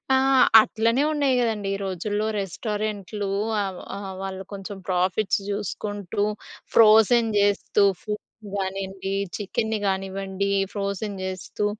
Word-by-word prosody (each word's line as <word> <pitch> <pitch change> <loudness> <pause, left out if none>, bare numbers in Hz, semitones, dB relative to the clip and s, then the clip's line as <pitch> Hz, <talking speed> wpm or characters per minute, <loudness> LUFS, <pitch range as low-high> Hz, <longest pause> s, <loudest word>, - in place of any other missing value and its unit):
ఆ! - - +5 0.5
అట్లనే 230 +5 +1
ఉన్నాయి 280 -3 +2
గదండీ 215 -4 -1
ఈ - - -3
రోజుల్లో 205 +3 -2
రెస్టారెంట్లు 205 +1 -3 0.3
ఆ - - +1 0.3
ఆహ్, 195 -1 -6
వాళ్ళు 190 0 -5
కొంచెం 195 0 -7
ప్రాఫిట్స్ 185 +3 +1
జూసుకుంటూ 205 0 -2 0.5
ఫ్రోజెన్ 225 +1 +6
జేస్తూ 205 0 +2 0.2
ఫుడ్‌ని 210 -1 -4 0.3
గానియండి 195 0 -3 0.2
చికెన్ని 220 +2 -1
గానివ్వండి 195 0 -2 0.2
ఫ్రోజెన్ 200 0 -3
జేస్తూ 190 +2 -3
200 Hz, 105 wpm, -24 LUFS, 195-215 Hz, 0.5 s, ఫ్రోజెన్